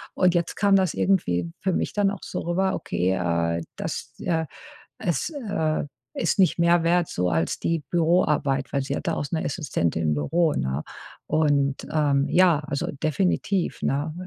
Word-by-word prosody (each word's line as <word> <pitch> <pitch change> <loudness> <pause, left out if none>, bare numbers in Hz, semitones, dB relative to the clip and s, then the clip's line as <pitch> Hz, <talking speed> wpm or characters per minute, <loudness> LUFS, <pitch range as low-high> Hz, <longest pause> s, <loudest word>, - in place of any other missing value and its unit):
Und 180 -1 +3
jetzt 170 -1 0
kam 200 -1 +4
das 190 -4 +2
irgendwie 90 - +1
für 190 - +1
mich - - -1
dann 205 -1 +2
auch 200 - -8
so - - -4
rüber: 190 +3 0
„Okay, 90 +2 -1
äh, 85 -2 0 0.2
das, - - -5
äh 160 -1 0 0.5
es, 175 - -1
äh, 200 - -1 0.3
ist 170 - 0
nicht 185 - +3
mehr 170 0 +4
wert 170 +1 +2
so 90 0 -1
als 80 -1 0
die 165 -3 -1
Büroarbeit,“ 155 -5 +1
weil 140 - +1
sie 140 +1 -3
hat - - -5
da - - +1
auch - - -2
'ne 160 - -1
Assistentin 105 - -1
im 75 -1 +1
Büro, 155 - +1
ne? 65 +3 -1 0.5
Und, 145 -3 +1
ähm, 145 -3 +2
ja, 180 -4 +5
also, 145 -2 -2
definitiv, 180 +3 0
ne, 145 +3 0
160 Hz, 170 wpm, -25 LUFS, 135-180 Hz, 0.5 s, ja